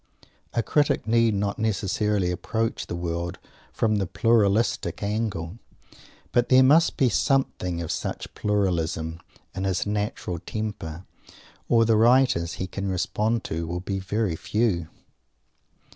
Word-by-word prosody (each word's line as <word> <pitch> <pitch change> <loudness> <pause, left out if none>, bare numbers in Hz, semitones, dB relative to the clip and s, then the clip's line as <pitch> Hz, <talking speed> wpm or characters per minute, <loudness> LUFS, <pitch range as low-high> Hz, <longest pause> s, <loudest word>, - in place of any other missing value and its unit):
A 115 - +2
critic 145 -2 +1
need 115 -1 +3
not 100 0 -1
necessarily 105 -2 0
approach 110 +5 -2
the - - -4
world 85 0 -3 0.3
from 110 -2 +1
the 95 -2 -1
"pluralistic" 115 +1 +1
angle; 100 -3 -2 0.7
but 120 0 +2
there 130 0 +7
must 155 +6 +4
be 135 - +4
something 110 - 0
of 80 - -4
such - - -4
"pluralism" 85 -5 -1 0.3
in 95 - -4
his 95 -2 0
natural 105 -4 -2
temper, 95 -5 -5 0.6
or 115 -1 +5
the 110 -1 +3
writers 115 -7 +4
he 95 - -4
can 100 +1 -4
respond 105 +5 0
to 80 +1 -3
will 85 +1 -3
be 95 +1 -3
very 100 -1 -1
few! 100 -3 0
105 Hz, 130 wpm, -25 LUFS, 90-115 Hz, 0.7 s, there